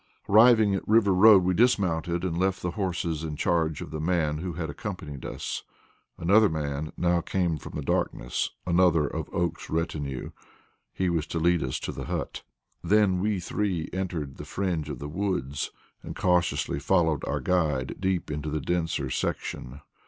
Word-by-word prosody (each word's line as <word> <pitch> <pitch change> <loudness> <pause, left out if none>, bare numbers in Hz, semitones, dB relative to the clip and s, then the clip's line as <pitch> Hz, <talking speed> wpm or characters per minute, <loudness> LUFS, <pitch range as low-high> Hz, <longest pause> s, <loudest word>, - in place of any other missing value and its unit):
Arriving 110 -1 +6
at 95 - -3
River 105 -3 +4
Road, 100 0 +7
we 90 +1 +2
dismounted 90 -7 +2
and 90 -3 -1
left 95 +2 0
the 90 - -1
horses 85 -4 -2
in 75 -2 -4
charge 80 -1 0
of - - -7
the 75 - -4
man 80 -3 0
who 90 +1 -4
had 80 -1 -3
accompanied 80 - -6
us. - - -4 0.6
Another 100 +5 +5
man 75 0 -3
now 85 -1 +2
came 90 -2 0
from - - -10
the 75 - -3
darkness - - -1 0.2
another 85 -3 +4
of - - -5
Oakes's 85 -1 -2
retinue. 75 -5 -3 0.6
He 95 - -1
was 80 -2 -1
to - - -3
lead 85 +1 +3
us 65 - -2
to - - -3
the - - -6
hut. - - -4 0.4
Then 100 -3 +3
we 105 0 0
three 90 -2 -2
entered 85 -7 -3
the - - -7
fringe 85 -6 -2
of 75 - -4
the 70 - -6
woods, 75 -5 -2 0.3
and - - -8
cautiously 90 -5 +1
followed 80 -1 +2
our - - -1
guide 75 -8 0
deep 95 -4 -1
into 75 +1 -3
the 75 +1 -1
denser 80 -4 -1
section. 65 +2 -3
85 Hz, 170 wpm, -27 LUFS, 75-95 Hz, 0.6 s, Road